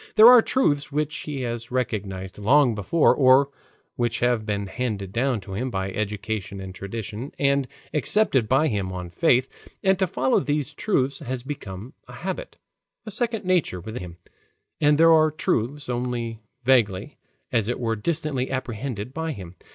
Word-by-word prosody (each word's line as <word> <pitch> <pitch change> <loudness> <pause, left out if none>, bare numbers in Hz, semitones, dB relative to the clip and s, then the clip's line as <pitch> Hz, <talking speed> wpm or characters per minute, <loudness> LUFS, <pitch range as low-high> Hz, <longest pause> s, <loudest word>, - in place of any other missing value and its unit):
There 215 +1 +8
are 250 -2 +9
truths 150 - +1
which 150 +1 -1
he 145 -3 -4
has 120 -1 -4
recognized 100 -7 -3
long 125 +4 +4
before 110 - +3
or 135 +1 +5 0.5
which 120 -1 0
have 120 -3 +1
been 100 -1 -1
handed 100 -3 -3
down 120 -2 0
to 95 0 -9
him 125 +7 -2
by 95 -3 -3
education 105 -1 -3
and 95 -1 -7
tradition 110 - -6
and 140 -1 +2 0.3
accepted 150 - +2
by 135 +4 +4
him 100 -7 -2
on 90 -2 -6
faith, 125 +8 +3 0.4
and 190 -1 +3
to 190 - +2
follow 130 -4 +2
these 145 0 -1
truths 140 -7 0
has 125 0 -5
become 125 -4 -7
a - - -11
habit, - - -5 0.5
a 215 - -5
second 225 -1 -2
nature 180 - +1
with 110 +7 -6
him; 85 -2 -9 0.6
and 150 -1 +4
there 165 +1 +7
are 155 -1 +5
truths, 145 -2 -1
only 120 -2 -3 0.2
vaguely, 115 -2 +2 0.3
as 115 -5 +1
it 120 - -2
were 115 -2 0
distantly, 150 +1 -2
apprehended 125 -2 -4
by 160 +1 -3
him. 90 -6 -9
125 Hz, 165 wpm, -24 LUFS, 105-145 Hz, 0.6 s, are